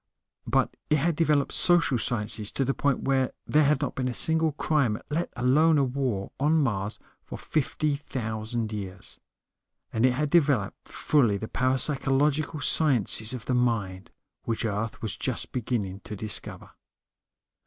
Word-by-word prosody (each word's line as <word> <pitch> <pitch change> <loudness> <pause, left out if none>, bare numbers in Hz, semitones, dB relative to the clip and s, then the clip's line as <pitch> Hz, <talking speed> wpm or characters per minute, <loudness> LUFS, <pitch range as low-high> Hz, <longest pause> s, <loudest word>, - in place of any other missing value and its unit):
But - - +1
it 150 - +4
had 160 +3 +1
developed 150 -3 +1
social 165 -8 +4
sciences 105 -2 0
to 135 - 0
the 135 - 0
point 140 -1 0
where 135 -1 +1
there 150 0 +3
had 145 0 +2
not 140 - -2
been 130 -1 -2
a 125 - -3
single 160 -1 +2
crime, 140 -7 0
let 170 +3 -1
alone 150 +6 +3
a 140 - +3
war, 125 -7 -2
on 150 +4 +3
Mars 105 -7 -1 0.3
for - - -8
fifty 150 -1 -1
thousand 110 -4 -4
years. 95 -3 -7 0.7
And 115 - 0
it 130 -1 +4
had 145 +3 -2
developed 140 - +1
fully 120 -9 +1
the 110 - -6
parapsychological 140 +3 0
sciences 120 -7 +3
of 115 - -8
the 130 - -1
mind, 105 -7 -1 0.3
which 115 0 -2
Earth 110 +2 -3
was 110 - -3
just - - -3
beginning 105 -6 -3
to 105 - -6
discover. 105 +1 -5
130 Hz, 155 wpm, -26 LUFS, 110-150 Hz, 0.7 s, it